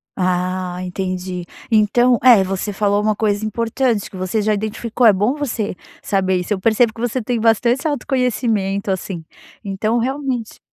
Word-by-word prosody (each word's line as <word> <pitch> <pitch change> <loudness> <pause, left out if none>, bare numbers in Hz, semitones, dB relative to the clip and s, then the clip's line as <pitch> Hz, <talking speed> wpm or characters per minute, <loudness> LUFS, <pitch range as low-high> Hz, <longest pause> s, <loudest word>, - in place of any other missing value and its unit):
Ah, 180 0 -1
entendi. 185 -1 -4 0.3
Então, 230 +3 +4
é, 235 -6 +7
você 195 +2 -3
falou 205 0 +1
uma 215 0 +1
coisa 210 0 0
importante 230 0 -1
que - - -11
você 185 +3 -1
já 215 0 +2
identificou, 220 +3 0
é 215 - +7
bom 205 +6 +1
você 235 -9 -3 0.3
saber 190 -2 +1
isso. 180 +4 -2
Eu 190 - -3
percebo 220 +2 +3
que 230 - -9
você 245 +1 -1
tem 235 +1 -1
bastante 235 +5 +2
autoconhecimento, 230 -8 0
assim, 180 -3 -4 0.4
então 215 +4 -1
realmente 260 -2 -2
215 Hz, 155 wpm, -19 LUFS, 190-235 Hz, 0.4 s, é